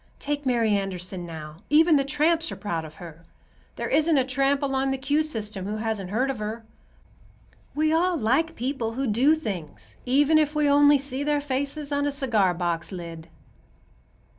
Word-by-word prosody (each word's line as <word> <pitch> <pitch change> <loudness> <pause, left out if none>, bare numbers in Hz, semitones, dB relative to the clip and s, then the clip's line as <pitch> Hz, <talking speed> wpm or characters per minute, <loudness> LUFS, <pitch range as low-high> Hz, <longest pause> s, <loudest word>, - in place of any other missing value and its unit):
Take 290 -1 -3
Mary 235 -3 +2
Anderson, 185 -3 -2
now; 155 -2 -8
even 315 +2 +5
the 275 - +3
tramps 315 +4 +1
are - - -5
proud 170 -6 -4
of 155 0 -12
her. 165 -1 -11 0.5
There - - -3
isn't 315 -1 +3
a 260 - +3
tramp 275 +2 +1
along 270 -1 0
the 270 - -1
'Q' 285 +3 +1
system 215 -10 -3
who 210 +1 -3
hasn't 215 -4 -3
heard 250 +7 0
of 255 - -7
her. 220 +2 -5 1.1
We 310 +1 +2
all 350 +2 +2
like 295 +7 +1
people 245 -3 -3
who 270 +3 -2
do 255 +7 +3
things, 195 - -7
even 290 +4 +4
if 305 0 0
we 300 -1 +2
only 290 0 +6
see 275 0 -2
their 295 0 +1
faces 285 +1 -3
on 285 0 0
a - - 0
cigar 225 - +1
box 170 0 -2
lid." 165 -3 -8
265 Hz, 180 wpm, -25 LUFS, 205-290 Hz, 1.1 s, only